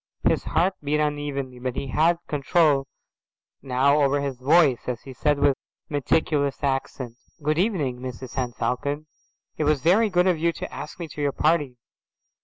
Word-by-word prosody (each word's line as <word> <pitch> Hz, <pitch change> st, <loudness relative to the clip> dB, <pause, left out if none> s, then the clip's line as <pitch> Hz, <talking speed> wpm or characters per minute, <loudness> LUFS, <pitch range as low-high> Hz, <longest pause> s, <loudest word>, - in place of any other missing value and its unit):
His -, -, +1 dB
heart 175 Hz, +5 st, +2 dB
beat 150 Hz, +1 st, +1 dB
unevenly, 145 Hz, -4 st, -2 dB
but 125 Hz, 0 st, -3 dB
he 135 Hz, -, -4 dB
had 165 Hz, +6 st, +3 dB
control 145 Hz, -1 st, +2 dB, 0.7 s
now 140 Hz, +3 st, +3 dB
over 140 Hz, 0 st, +3 dB
his 140 Hz, -3 st, -3 dB
voice, 140 Hz, -1 st, +4 dB
as 125 Hz, -2 st, -3 dB
he 135 Hz, -, -9 dB
said 145 Hz, +3 st, +1 dB
with 140 Hz, -1 st, +3 dB, 0.3 s
meticulous 145 Hz, 0 st, 0 dB
accent, 135 Hz, -3 st, -2 dB, 0.3 s
"Good 155 Hz, +2 st, +1 dB
evening, 160 Hz, -, 0 dB
Mrs 130 Hz, 0 st, -7 dB
Henne 125 Hz, -2 st, -2 dB
Falcon. 145 Hz, +6 st, -2 dB, 0.5 s
It 155 Hz, -, 0 dB
was 150 Hz, -2 st, +2 dB
very 210 Hz, +6 st, +4 dB
good 180 Hz, -2 st, +3 dB
of 180 Hz, -4 st, +2 dB
you 170 Hz, +1 st, +1 dB
to -, -, -7 dB
ask 150 Hz, -, -7 dB
me 170 Hz, -, -4 dB
to 150 Hz, -, -7 dB
your 145 Hz, -1 st, +1 dB
party." 150 Hz, -5 st, +1 dB
145 Hz, 170 wpm, -24 LUFS, 130-155 Hz, 0.7 s, voice